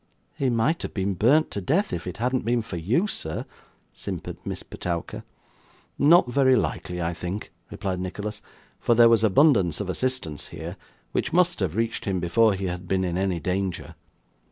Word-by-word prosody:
'He 135 - 0
might 120 +8 +1
have - - -6
been 95 0 0
burnt 130 - +3
to 100 - -3
death, 170 - +1
if 85 +1 -4
it 90 - -5
hadn't 125 +2 0
been 120 0 +1
for 110 - -7
you, 110 - +1
sir,' 80 - -4 0.5
simpered - - -6
Miss - - -5
Petowker. 85 -1 -5 0.8
'Not 160 +1 +6
very 130 +1 +4
likely, 90 -6 -2
I 85 0 -1
think,' 90 +4 -5 0.2
replied 95 -2 -3
Nicholas; 105 +3 -5 0.4
'for 120 - +2
there 115 0 +7
was 115 -1 +4
abundance 110 - +4
of 100 -3 -2
assistance 125 - -2
here, - - -7 0.4
which - - -1
must 175 0 +3
have 95 -4 -1
reached 115 +1 -1
him 95 -2 0
before 100 +5 +3
he 95 0 -4
had 90 0 -4
been 95 +1 +1
in 90 -2 -1
any 95 -2 0
danger. 95 +1 -2
100 Hz, 180 wpm, -25 LUFS, 90-125 Hz, 0.8 s, there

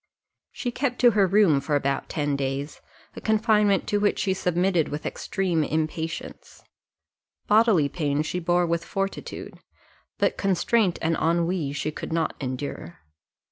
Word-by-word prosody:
She 245 - -4
kept 250 0 -2
her 210 -5 +5
room 185 -7 +4
for 145 +2 -1
about 140 -1 -1
ten 145 -2 -1
days; 140 +1 -3 0.3
a - - -8
confinement 210 -2 +2
to 205 - +1
which 205 0 +1
she 190 - +1
submitted 180 -2 +1
with 150 +1 -5
extreme 180 -5 -1
impatience: 160 +2 -4 0.8
bodily 210 -8 +4
pain 145 -1 -1
she 180 +3 -3
bore 175 +1 +2
with 170 0 -1
fortitude, 195 0 -5 0.6
but - - +1
constraint 195 0 +2
and 165 0 +2
ennui 170 -2 0
she 155 +1 -2
could - - -7
not 165 -1 0
endure. 130 - -5
170 Hz, 140 wpm, -25 LUFS, 150-195 Hz, 0.8 s, her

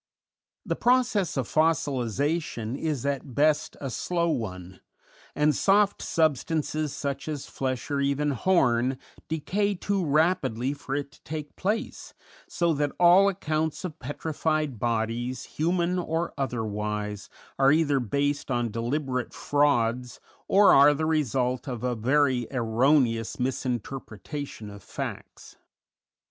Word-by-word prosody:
The - - -1
process 240 - +2
of 130 -4 -1
fossilization 145 - 0
is 145 -3 -2
at 140 -3 -3
best 150 +1 +2
a 135 -2 -4
slow 170 +5 -1
one, 95 - -4 0.6
and 150 0 +3
soft 205 +1 +3
substances 155 -1 0
such 140 0 -4
as 150 -3 -4
flesh, 130 +1 -4
or 140 -1 +1
even 140 +1 +1
horn, 130 -4 +2 0.3
decay 195 +6 -1
too 195 +1 -1
rapidly 150 -5 +1
for 140 -1 -5
it 140 -1 -3
to - - -21
take 155 -1 -6
place, 215 +4 -3 0.3
so 170 -1 +1
that 145 -1 -1
all 180 +3 +7
accounts 160 -3 -2
of 160 -3 -7
petrified 150 -1 -2
bodies, 120 +2 -1
human 175 +3 0
or 165 0 -2
otherwise, 105 -5 -3 0.3
are 135 0 +6
either 145 -3 +3
based 140 +5 -1
on 120 -3 0
deliberate 125 +3 -2
frauds 125 -4 +1 0.3
or 200 +1 +6
are 145 +2 +7
the 155 +2 -1
result 130 -5 0
of 125 -3 -5
a 125 -1 0
very 130 +1 +2
erroneous 120 -1 +2
misinterpretation 125 - -4
of 100 0 -11
facts. - - -7
140 Hz, 125 wpm, -26 LUFS, 120-160 Hz, 0.6 s, all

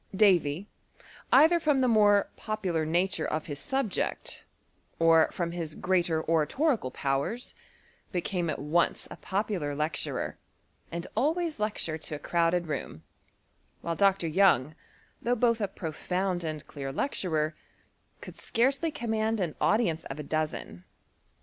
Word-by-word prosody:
Davy, 185 -4 +3 0.6
either 340 +3 +6
ttom 295 -4 +2
the 255 - +3
more 205 -3 +4
popular 185 -8 -2
nature 180 +4 +1
of 155 0 -2
his 145 -2 -5
sul^ect, 270 - -2 0.6
or 165 -1 +5
firom 170 -1 -3
his 165 -3 -4
greater 175 -4 0
oratorical 165 - +1
powers, 140 - -2 0.6
became 180 -2 -1
at 155 - -1
once 155 +4 0
a - - -7
pc^ular 190 -8 -2
lecturer, 155 +1 -2 0.5
and 170 +1 -4
always 320 0 0
lectured 190 -7 -2
to 155 - -5
a - - -4
crowded 170 +3 +1
vocon; 140 - -5 0.8
while 170 0 -2
Dr. 195 -1 +3
Young, 160 -5 +3 0.5
though 245 +1 +1
both 230 -1 +2
a 205 - +1
profound 180 +1 -2
and 155 -2 -4
clear 135 -2 -6
lecturer, 155 - -1 0.7
could - - -10
scarcely 270 +7 +1
command 220 -4 -1
an 175 -5 -1
au 210 - +4
dience 170 -9 -1
of 135 - -6
a 150 - -5
dozen. 155 - -3
175 Hz, 135 wpm, -29 LUFS, 155-215 Hz, 0.8 s, either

